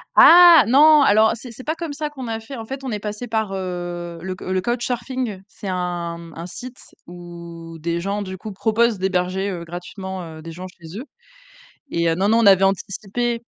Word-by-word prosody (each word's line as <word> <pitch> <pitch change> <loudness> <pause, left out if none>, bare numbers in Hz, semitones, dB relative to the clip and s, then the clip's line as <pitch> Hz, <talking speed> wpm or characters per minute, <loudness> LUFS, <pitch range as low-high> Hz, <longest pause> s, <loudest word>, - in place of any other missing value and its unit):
Ah 345 -4 +9
non, 300 +5 +7
alors 220 -3 +5
c'est 240 +2 -10
c'est 255 +3 -11
pas 315 - -1
comme 330 -2 -5
ça 300 +1 -4
qu'on 265 -4 -7
a 225 0 -3
fait, 245 +5 -9
en 225 -2 -7
fait, 270 +3 -7
on 260 - -4
est 210 - -2
passé 210 +3 -5
par, 220 -3 -1
heu 175 -2 -5
le 185 0 -4
le 185 0 -2
CouchSurfing 240 -1 -3
c'est 205 - -10
un, 175 -2 -3
mmh, 165 -1 -12
un 165 - -6
site 245 +9 -9 0.3
où 170 -1 -10
des 170 +2 -2
gens, 200 +3 -2
du 190 -1 -6
coup, 215 +3 -8
proposent 220 +1 +1
d'héberger, 190 +1 -1
heu, 175 -3 -5
gratuitement, 185 +2 -7 0.2
heu, 155 - -11
des 165 - -8
gens 180 +3 -8
chez 175 +2 -10
eux 260 - -7 0.9
et 170 0 +1
heu, 165 - +1
non, 195 +4 +1
non, 225 - +4
on 230 - +3
avait 195 -1 +6
anticipé. 205 +5 -1
195 Hz, 210 wpm, -21 LUFS, 175-235 Hz, 0.9 s, Ah